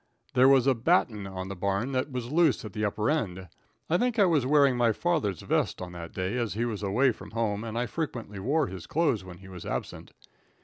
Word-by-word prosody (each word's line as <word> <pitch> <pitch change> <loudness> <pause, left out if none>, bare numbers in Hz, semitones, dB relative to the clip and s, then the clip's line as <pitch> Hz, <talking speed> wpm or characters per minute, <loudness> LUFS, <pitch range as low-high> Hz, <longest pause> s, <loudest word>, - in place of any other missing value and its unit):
There 130 +1 +6
was 135 -2 +5
a 135 - +5
"batten" 115 - +1
on 95 -1 -6
the 95 - -5
barn 100 +7 -1
that 130 +2 -1
was 125 -1 -4
loose 160 -7 +3
at 105 - -8
the 105 - -3
upper 105 +1 0
end. 95 - -2 0.4
I 175 +3 +2
think 245 -1 0
I 205 - +6
was 155 -8 +2
wearing 140 -2 +4
my 120 -2 +3
father's 150 - -1
vest - - 0
on 90 -1 -6
that 85 -1 -8
day, 95 +6 -2
as 115 -5 -2
he 115 +2 0
was 110 -4 -3
away 115 +7 +3
from - - -11
home, 110 -2 -1
and 115 0 -5
I 120 - 0
frequently 120 -7 -5
wore 145 +9 +1
his 95 -7 -8
clothes 145 - +1
when 90 -2 -10
he 95 - -14
was 90 -3 -9
absent. - - -5
115 Hz, 230 wpm, -28 LUFS, 100-140 Hz, 0.4 s, There